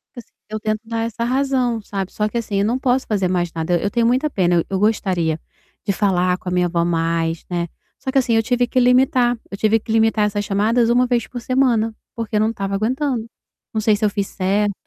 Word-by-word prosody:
Assi 240 Hz, -, -11 dB, 0.2 s
eu 215 Hz, 0 st, -4 dB
tento 215 Hz, 0 st, -1 dB
dar 230 Hz, 0 st, -3 dB
essa 230 Hz, +1 st, -3 dB
razão, 255 Hz, -2 st, 0 dB
sabe. 195 Hz, -2 st, -4 dB
Só 210 Hz, -, -1 dB
que 235 Hz, -, -3 dB
assim, 220 Hz, -3 st, -3 dB
eu 200 Hz, -, +2 dB
não 240 Hz, +4 st, 0 dB
posso 255 Hz, 0 st, +1 dB
fazer 200 Hz, -4 st, +1 dB
mais 175 Hz, -2 st, 0 dB
nada, 165 Hz, +2 st, 0 dB
eu 200 Hz, -, 0 dB
tenho 235 Hz, +1 st, +1 dB
muita 260 Hz, +5 st, +2 dB
pena, 180 Hz, -7 st, +1 dB
eu 170 Hz, -, +1 dB
eu 190 Hz, -1 st, -1 dB
gostaria 180 Hz, -7 st, +1 dB, 0.5 s
de -, -, +1 dB
falar 180 Hz, -2 st, +1 dB
com 185 Hz, -, -6 dB
a -, -, -4 dB
minha 180 Hz, 0 st, +2 dB
avó 170 Hz, -1 st, 0 dB
mais, 165 Hz, -1 st, 0 dB
né. 175 Hz, -1 st, -1 dB, 0.3 s
Só 265 Hz, -, -3 dB
que -, -, 0 dB
assim, 240 Hz, -2 st, 0 dB
eu 225 Hz, 0 st, +3 dB
tive 245 Hz, +1 st, +1 dB
que 255 Hz, -, +1 dB
limitar, 250 Hz, -1 st, +3 dB
eu 200 Hz, -, -6 dB
tive 220 Hz, +2 st, +3 dB
que 220 Hz, -, -7 dB
limitar 225 Hz, -1 st, +3 dB
essas 205 Hz, 0 st, -1 dB
chamadas 225 Hz, +4 st, +2 dB
1 250 Hz, +1 st, +3 dB
vez 240 Hz, -2 st, 0 dB
por 245 Hz, -1 st, -7 dB
semana, 235 Hz, -3 st, +1 dB, 0.2 s
porque 230 Hz, -1 st, -4 dB
eu -, -, +3 dB
não 215 Hz, +1 st, +2 dB
estava 200 Hz, -3 st, -3 dB
aguentando. 245 Hz, +3 st, -1 dB, 0.5 s
Não 220 Hz, -, 0 dB
sei 215 Hz, 0 st, +3 dB
se 210 Hz, +1 st, 0 dB
eu -, -, +3 dB
fiz 200 Hz, -1 st, -2 dB
certo 200 Hz, +2 st, 0 dB
215 Hz, 240 wpm, -20 LUFS, 195-240 Hz, 0.5 s, eu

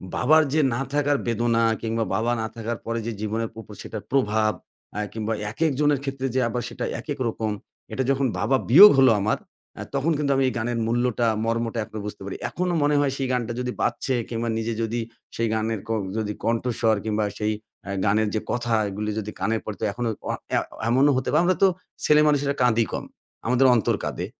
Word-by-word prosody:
বাবার 155 Hz, +5 st, +5 dB
যে, 155 Hz, -, +3 dB
না 120 Hz, -, -1 dB
থাকার 145 Hz, 0 st, +2 dB
বেদনা 115 Hz, 0 st, +1 dB, 0.2 s
কিংবা 115 Hz, 0 st, -1 dB
বাবা 115 Hz, +3 st, +1 dB
না 110 Hz, -, -2 dB
থাকার 115 Hz, 0 st, -3 dB
পরে 115 Hz, 0 st, -2 dB
যে, 115 Hz, -, -2 dB
জীবনের 110 Hz, +1 st, -2 dB
উপর 110 Hz, -, -13 dB
সেটার 110 Hz, -2 st, -7 dB
প্রভাব। 110 Hz, -5 st, +2 dB, 0.4 s
অ্যা 105 Hz, -, -3 dB
কিংবা 110 Hz, 0 st, -2 dB, 0.2 s
একেক 160 Hz, +7 st, +1 dB
জনের 145 Hz, -2 st, +3 dB
ক্ষেত্রে 135 Hz, -1 st, -3 dB
যে, -, -, +3 dB
আবার 120 Hz, +2 st, -2 dB
সেটা 120 Hz, -, -4 dB
একেক 140 Hz, +3 st, -5 dB
রকম 110 Hz, -1 st, -2 dB, 0.4 s
এটা 130 Hz, -, 0 dB
যখন 135 Hz, 0 st, +2 dB
বাবা 110 Hz, +7 st, +2 dB
বিয়োগ 195 Hz, -, +11 dB
হল 130 Hz, -1 st, +7 dB
আমার 105 Hz, +2 st, +1 dB, 0.4 s
অ্যা -, -, -7 dB
তখন 140 Hz, +5 st, +1 dB
কিন্তু 145 Hz, -1 st, 0 dB
আমি 135 Hz, -, +2 dB
এই 130 Hz, -, -1 dB
গানের 120 Hz, 0 st, -1 dB
মূল্যটা 120 Hz, 0 st, +1 dB, 0.2 s
মর্মটা 115 Hz, 0 st, -1 dB
এখনো 110 Hz, +1 st, -8 dB
বুঝতে 105 Hz, -, -7 dB
পারি। 100 Hz, -, -5 dB
এখনো 180 Hz, 0 st, -1 dB
মনে 145 Hz, 0 st, +3 dB
হয় 145 Hz, -2 st, +2 dB
সেই 135 Hz, -, -1 dB
গানটা 120 Hz, -1 st, -1 dB
যদি 125 Hz, 0 st, -2 dB
বাজছে 135 Hz, -, 0 dB, 0.2 s
কিংবা 115 Hz, 0 st, -2 dB
নিজে 115 Hz, +1 st, -2 dB
যদি 115 Hz, +1 st, -1 dB, 0.4 s
সেই 115 Hz, -, 0 dB
গানের 110 Hz, 0 st, -1 dB
ক -, -, -17 dB, 0.3 s
যদি 105 Hz, -1 st, -2 dB
কণ্ঠস্বর 115 Hz, -1 st, +1 dB
কিংবা 110 Hz, 0 st, 0 dB, 0.2 s
সেই 105 Hz, 0 st, 0 dB, 0.3 s
অ্যা 100 Hz, -, -6 dB
গানের 105 Hz, +2 st, +2 dB
যে, 110 Hz, -, +1 dB
কথা 120 Hz, -1 st, -1 dB, 0.2 s
এগুলো 105 Hz, +2 st, -4 dB
যদি 105 Hz, 0 st, -5 dB
কানে 110 Hz, +4 st, +1 dB
পড়ে 105 Hz, -, -6 dB
তো -, -, +1 dB
এখনো 120 Hz, +2 st, -2 dB, 0.2 s
অ -, -, +2 dB, 0.2 s
অ্যা -, -, +3 dB, 0.3 s
এমনও 135 Hz, +4 st, +4 dB
হতে 130 Hz, -, -2 dB
পারে। 155 Hz, -, +4 dB
আমরা 185 Hz, +1 st, +3 dB
তো -, -, +8 dB, 0.4 s
ছেলেমানুষেরা 150 Hz, -2 st, +4 dB
কাঁদি 115 Hz, -2 st, +3 dB
কম। -, -, -3 dB, 0.4 s
আমাদের 125 Hz, +2 st, +3 dB
অন্তর 110 Hz, -7 st, +2 dB
কাঁদে। -, -, -3 dB
115 Hz, 200 wpm, -24 LUFS, 110-135 Hz, 0.4 s, বিয়োগ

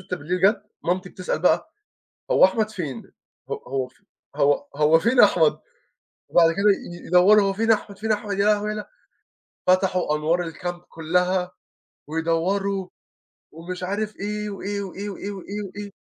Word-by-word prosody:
ستة 180 Hz, 0 st, -5 dB
بالليل 180 Hz, +5 st, -3 dB
جات. 200 Hz, +2 st, +3 dB, 0.2 s
مامتي 180 Hz, +2 st, -1 dB
بتسأل 185 Hz, -4 st, -3 dB
بقى: 315 Hz, -, +2 dB, 0.6 s
"هو -, -, +7 dB
أحمد 215 Hz, +3 st, 0 dB
فين؟ 150 Hz, -, -6 dB, 0.4 s
ه -, -, -10 dB, 0.2 s
هو 130 Hz, 0 st, -2 dB
ف 125 Hz, -, -24 dB, 0.4 s
هو 145 Hz, -1 st, +2 dB
هو 155 Hz, +2 st, +4 dB
فين 235 Hz, +7 st, +2 dB
أحمد؟" -, -, +5 dB, 0.7 s
وبعد 165 Hz, -1 st, +5 dB
كده 195 Hz, +4 st, -2 dB, 0.4 s
ي -, -, -11 dB
يدوّروا، 190 Hz, +4 st, +6 dB
هو 195 Hz, 0 st, +1 dB
فين 225 Hz, +3 st, +2 dB
أحمد، 205 Hz, -2 st, -1 dB
فين 220 Hz, +1 st, -2 dB
أحمد، 205 Hz, -1 st, -2 dB
يا 200 Hz, -, +3 dB
لهوي، 210 Hz, 0 st, +2 dB
يا 215 Hz, -, -2 dB
له 210 Hz, -, -5 dB, 0.8 s
فتحوا 185 Hz, -4 st, +2 dB
أنوار 160 Hz, +4 st, +1 dB
الكامب 175 Hz, +1 st, -5 dB
كُلّها، 180 Hz, +3 st, 0 dB, 0.6 s
ويدوّروا، 180 Hz, +5 st, -1 dB, 0.6 s
ومش 180 Hz, +3 st, -7 dB
عارف 210 Hz, +3 st, -3 dB
إيه، 210 Hz, +1 st, -4 dB
وإيه، 200 Hz, 0 st, -4 dB
وإيه، 200 Hz, +1 st, -6 dB
وإيه، 200 Hz, +1 st, -6 dB
وإيه، 200 Hz, +1 st, -6 dB
وإيه. 205 Hz, +1 st, -7 dB
190 Hz, 155 wpm, -23 LUFS, 170-205 Hz, 0.8 s, هو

